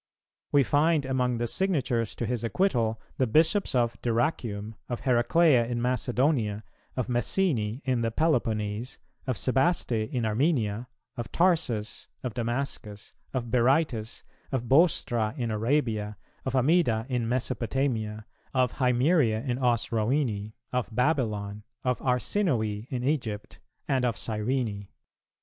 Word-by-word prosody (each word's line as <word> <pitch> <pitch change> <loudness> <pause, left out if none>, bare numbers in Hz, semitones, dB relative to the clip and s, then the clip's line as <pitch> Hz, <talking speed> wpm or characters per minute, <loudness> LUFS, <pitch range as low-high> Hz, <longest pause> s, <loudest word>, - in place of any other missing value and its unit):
We 140 -1 +5
find 150 +2 +2
among 125 -2 0
the 120 - -1
signatures 130 - 0
to 120 - -2
his 120 0 -2
acquittal 115 - +1 0.2
the 130 - +3
Bishops 160 - +3
of 120 -1 +1
Dyrrachium, 115 -3 -1 0.2
of 120 - -3
Heraclea 125 +1 +4
in 120 0 -2
Macedonia, 125 -3 0 0.3
of 125 - 0
Messene 120 - 0
in 130 -3 +1
the 115 - +1
Peloponese, 115 -5 0 0.3
of 130 -4 0
Sebaste 135 - +1
in 115 +1 -1
Armenia, 115 -2 0 0.3
of 120 -2 -5
Tarsus, 140 - +1 0.2
of 125 -4 -3
Damascus, 115 -3 -4 0.2
of 120 -3 -3
Berytus, 125 -2 +1 0.3
of 130 -3 -1
Bostra 130 -6 +3
in 120 -3 -2
Arabia, 110 -3 0 0.3
of 130 0 -1
Amida 130 -5 +3
in 120 -4 -1
Mesopotamia, 115 -3 -1 0.3
of 125 -1 +1
Himeria 125 -2 +2
in 125 0 -1
Osrhoene, 115 -2 0 0.2
of 125 -1 0
Babylon, 110 -6 0 0.2
of 125 -1 0
Arsinoe 125 - 0
in 125 -2 -3
Egypt, 120 -7 -2 0.3
and 130 -2 +1
of 120 -4 0
Cyrene. 110 -2 -2
120 Hz, 125 wpm, -28 LUFS, 110-135 Hz, 0.3 s, We